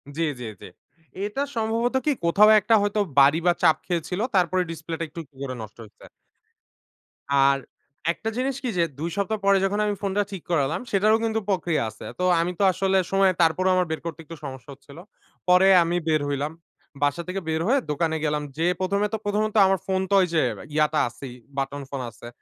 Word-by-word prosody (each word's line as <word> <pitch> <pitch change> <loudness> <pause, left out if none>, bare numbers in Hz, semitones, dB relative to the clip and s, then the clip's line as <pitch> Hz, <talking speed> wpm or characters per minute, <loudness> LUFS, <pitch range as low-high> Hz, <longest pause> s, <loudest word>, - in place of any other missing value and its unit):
জ্বী, 165 - 0 0.2
জ্বী, 120 - -5
জ্বী। - - -10 0.6
এটা 210 +7 -3
সম্ভবত 230 +3 0
কি, 300 - +3
কোথাও 205 +5 +6
একটা 215 +3 +3
হয়তো 205 +1 0 0.2
বাড়ি 140 +4 +6
বা 175 - +6
চাপ 160 - +5
খেয়েছিল, 180 +1 -2 0.2
তারপরে 185 0 +2
ডিসপ্লেটা 165 +1 -5
একটু 170 +2 -7 0.2
করে 135 -2 -4
নষ্ট 110 -1 -10
হইছে। 105 - -17 1.3
আর 140 0 +4 0.5
একটা 220 +6 -4
জিনিস 265 +1 -1
কি 255 - -1
যে, 170 - +4 0.2
২ 165 +3 -2
সপ্তাহ 210 +2 -1
পরে 200 0 +5
যখন 205 +2 -1
আমি 205 -1 -1
ফোনটা 200 +1 0
ঠিক 190 -4 -7
করালাম, 160 - +1
সেটারও 215 +3 +4
কিন্তু 225 -1 0
প্রক্রিয়া 175 -6 0
আছে। 110 - -12
তো 180 - -1 0.2
আমি 170 +2 0
তো - - +2
আসলে 190 +1 +1
সময় 195 -1 +4
তারপরেও 170 +3 +3
আমার 180 -2 +1
বের 160 - -3
করতে 165 -2 -5
একটু 165 - -9
সমস্যা 130 0 -9
হচ্ছিল। 140 +2 -16 0.5
পরে 180 +2 +6 0.2
আমি 170 +1 -1
বের 155 -2 +2
হইলাম। 145 +2 -2 0.5
বাসা 145 +4 +1
থেকে 190 +1 -3
বের 160 0 0
হয়ে 275 +4 +3
দোকানে 160 +2 0
গেলাম, 150 0 -1
যে 165 - 0
১ম 190 +2 0
এ - - +1
তো - - +1
প্রথমত 210 +1 0
আমার 190 0 +1
ফোন 190 -1 0
তো - - 0
ওই 185 - +2
যে 160 - +3 0.3
ইয়াটা 155 0 +2
আছেই, 125 +1 -10 0.2
বাটন 140 +1 -2
ফোন 140 -2 -4
আছে। 115 +1 -13
175 Hz, 195 wpm, -24 LUFS, 150-200 Hz, 1.3 s, কোথাও